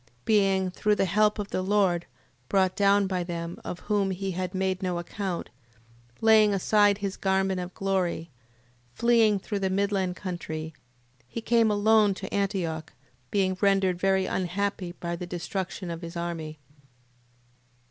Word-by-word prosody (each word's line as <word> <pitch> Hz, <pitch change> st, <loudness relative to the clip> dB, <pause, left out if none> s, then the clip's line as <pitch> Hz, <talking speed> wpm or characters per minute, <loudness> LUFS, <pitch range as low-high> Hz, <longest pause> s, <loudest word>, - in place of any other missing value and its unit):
Being, 195 Hz, -3 st, +2 dB
through 210 Hz, +3 st, +1 dB
the 195 Hz, -, +1 dB
help 210 Hz, +3 st, +2 dB
of 205 Hz, -1 st, -4 dB
the -, -, -1 dB
Lord, 185 Hz, -3 st, +1 dB, 0.4 s
brought 190 Hz, -1 st, +2 dB
down 200 Hz, 0 st, +4 dB
by 185 Hz, -2 st, -1 dB
them, 170 Hz, -1 st, -5 dB
of 180 Hz, -, -6 dB
whom 205 Hz, -2 st, 0 dB
he 190 Hz, +1 st, -3 dB
had 185 Hz, +1 st, -4 dB
made 190 Hz, 0 st, -1 dB
no 180 Hz, -2 st, -1 dB
account, 180 Hz, +1 st, -4 dB, 0.7 s
laying 215 Hz, -2 st, +5 dB
aside 205 Hz, +1 st, +3 dB
his 200 Hz, -1 st, -3 dB
garment 190 Hz, -1 st, 0 dB
of 180 Hz, 0 st, -6 dB
glory, 185 Hz, -4 st, -1 dB, 0.6 s
fleeing 230 Hz, -3 st, +4 dB
through 200 Hz, +1 st, -4 dB
the 190 Hz, -1 st, 0 dB
midland 190 Hz, -1 st, 0 dB
country, 160 Hz, -4 st, -5 dB, 0.5 s
he 180 Hz, -, -5 dB
came 230 Hz, -1 st, +3 dB
alone 210 Hz, -1 st, +4 dB
to 195 Hz, -, -7 dB
Antioch, 175 Hz, -6 st, -2 dB, 0.4 s
being 190 Hz, -2 st, +1 dB
rendered 195 Hz, -3 st, +3 dB
very 190 Hz, 0 st, +2 dB
unhappy 185 Hz, 0 st, -2 dB
by 170 Hz, -1 st, -4 dB
the 175 Hz, +1 st, -6 dB
destruction 180 Hz, +1 st, -4 dB
of 165 Hz, 0 st, -6 dB
his 170 Hz, 0 st, -7 dB
army. 165 Hz, -2 st, -4 dB
190 Hz, 145 wpm, -27 LUFS, 180-200 Hz, 0.7 s, laying